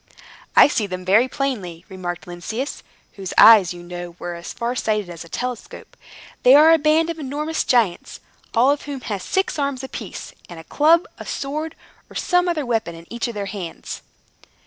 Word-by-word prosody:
"I - - +9
see 225 -8 -1
them 185 -1 -6
very 210 +7 +4
plainly," 210 -12 -4
remarked 180 -2 -6
Lynceus, 205 +10 -5 0.4
whose 190 -2 -6
eyes, 210 -6 +8
you 175 -1 -8
know, 175 0 -8
were 175 0 -5
as 170 0 -8
far 235 +1 -3
sighted 210 -6 -1
as 170 -1 -8
a 170 - -15
telescope. 250 +2 -6 0.5
"They 255 +2 +7
are 315 +3 +8
a 325 - +4
band 315 +2 +3
of 330 - -8
enormous 300 +3 -2
giants, 225 -8 +1 0.4
all 250 +4 +5
of 290 - -1
whom 280 -3 -6
have 205 -5 -4
six 380 - -1
arms 280 -2 -2
apiece, 265 - -7 0.2
and 170 -2 -9
a - - -10
club, 320 - +3
a - - -8
sword, 305 +3 -4 0.3
or - - -15
some 360 0 +2
other 310 -5 -1
weapon 225 -8 -1
in 165 0 -12
each 235 +1 -2
of 235 - -6
their 200 -1 -3
hands." 190 -4 -7
235 Hz, 190 wpm, -21 LUFS, 180-285 Hz, 0.5 s, I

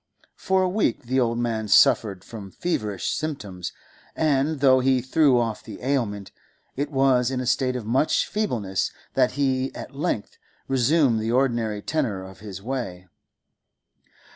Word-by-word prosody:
For 190 0 +1
a - - +2
week 185 - 0
the 130 +2 0
old 115 -2 +1
man 115 -2 -1
suffered 105 -5 +4
from 105 -4 -9
feverish 105 - -2
symptoms, 105 - -4 0.4
and, 150 -1 +1
though 130 -1 +5
he 130 0 +3
threw 130 +1 +3
off 115 -2 -2
the - - -9
ailment, 115 -8 -1 0.4
it 145 +2 -2
was 135 -3 +3
in 130 -1 -2
a 130 - -3
state 130 +1 +1
of 120 -4 -4
much 130 +7 +2
feebleness 115 - -1 0.2
that 130 -2 +2
he 130 -1 0
at - - -8
length 140 -8 -3 0.3
resumed 135 -1 +3
the 110 +1 -1
ordinary 120 -5 0
tenor 120 -12 -1
of 95 0 -12
his 100 -2 -9
way. 105 -8 -5
125 Hz, 150 wpm, -24 LUFS, 110-135 Hz, 0.4 s, though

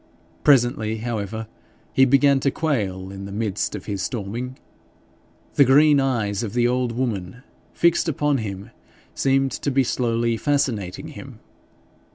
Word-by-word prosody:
Presently, 120 -5 +3
however, 110 -1 -4 0.5
he 135 - +5
began 140 +1 +4
to 140 - +1
quail 100 -12 -2
in 100 0 -7
the 100 - -8
midst 105 0 -2
of 100 - -8
his 100 -3 -3
storming. 120 +5 -4 1.0
The 140 - +6
green 145 +2 +5
eyes 115 -6 0
of 110 -3 -4
the 120 0 +2
old 125 -1 0
woman, 115 -2 -3 0.3
fixed 170 0 +2
upon 145 -2 +1
him, 100 0 -6 0.4
seemed 135 0 +1
to - - -3
be 135 0 +2
slowly 115 -2 0
fascinating 115 -9 -1
him. - - -11
120 Hz, 140 wpm, -23 LUFS, 105-135 Hz, 1.0 s, The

